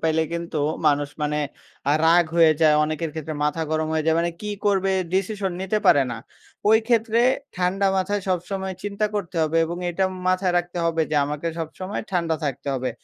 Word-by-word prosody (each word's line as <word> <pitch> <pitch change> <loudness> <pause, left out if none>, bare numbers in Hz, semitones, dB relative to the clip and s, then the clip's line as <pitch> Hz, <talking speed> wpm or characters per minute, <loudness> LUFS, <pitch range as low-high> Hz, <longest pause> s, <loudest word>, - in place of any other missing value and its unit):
পাইলে 160 0 +2
কিন্তু 170 -1 -3 0.3
মানুষ 145 -1 +2
মানে 150 0 0 0.5
আ - - +4
রাগ 170 +1 +6
হয়ে 165 -2 +7
যায় 155 -2 +6
অনেকের 155 +1 -3
ক্ষেত্রে 155 0 -5
মাথা 150 +2 0
গরম 155 0 0
হয়ে 160 -1 0
যায়, 160 0 +3
মানে 170 0 0
কী 210 - -3
করবে 195 -1 +2 0.2
ডিসিশন 195 0 -1
নিতে 190 +3 0
পারে 140 - +6
না। 115 - -4 0.5
ওই 220 - +7
ক্ষেত্রে 230 -1 +2 0.4
ঠান্ডা 185 +2 +1
মাথায় 200 +2 0
সবসময় 190 +1 -2
চিন্তা 205 +1 -1
করতে 185 -4 -3
হবে 155 +1 0
এবং 170 +2 -4
এটা 190 +3 0 0.2
মাথায় 185 -1 +1
রাখতে 175 0 -4
হবে 165 -1 +1
যে 155 - +1
আমাকে 150 +3 -4
সবসময় 185 +5 -5
ঠান্ডা 170 -3 0
থাকতে 140 0 -3
হবে। 130 -1 -2
170 Hz, 185 wpm, -23 LUFS, 155-190 Hz, 0.5 s, হয়ে